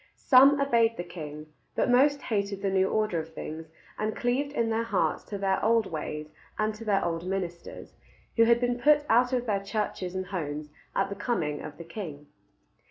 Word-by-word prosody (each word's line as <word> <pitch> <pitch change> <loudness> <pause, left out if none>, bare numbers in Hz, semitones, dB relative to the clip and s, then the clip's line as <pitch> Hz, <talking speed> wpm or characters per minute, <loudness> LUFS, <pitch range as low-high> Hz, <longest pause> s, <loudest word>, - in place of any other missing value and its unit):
Some 275 +2 +6
obeyed 230 -4 +3
the 175 - -3
king; 155 -3 -9 0.2
but - - +1
most 275 +3 +4
hated 200 -3 -2
the 195 - +1
new 190 0 +2
order 215 -6 0
of 160 0 -8
things, 160 +1 -6 0.3
and 215 0 -1
cleaved 260 +4 0
in 230 -5 0
their 225 +1 +1
hearts 230 - 0
to 205 - -5
their 195 -1 0
old 230 -1 +3
ways 150 -1 -5 0.3
and 215 0 0
to 215 +2 -9
their 205 -4 +1
old 170 +1 -2
ministers, 180 -3 -5 0.4
who 230 - +6
had 235 0 +5
been 245 0 0
put 295 +3 +4
out 245 +3 +4
of 250 -1 0
their 205 -4 0
churches 195 -3 -3
and 185 0 -2
homes 150 -5 -4 0.2
at 195 - +1
the 200 - -4
coming 180 - -2
of 150 -1 -8
the 170 - -8
king. 160 -5 -7
200 Hz, 195 wpm, -28 LUFS, 170-235 Hz, 0.4 s, Some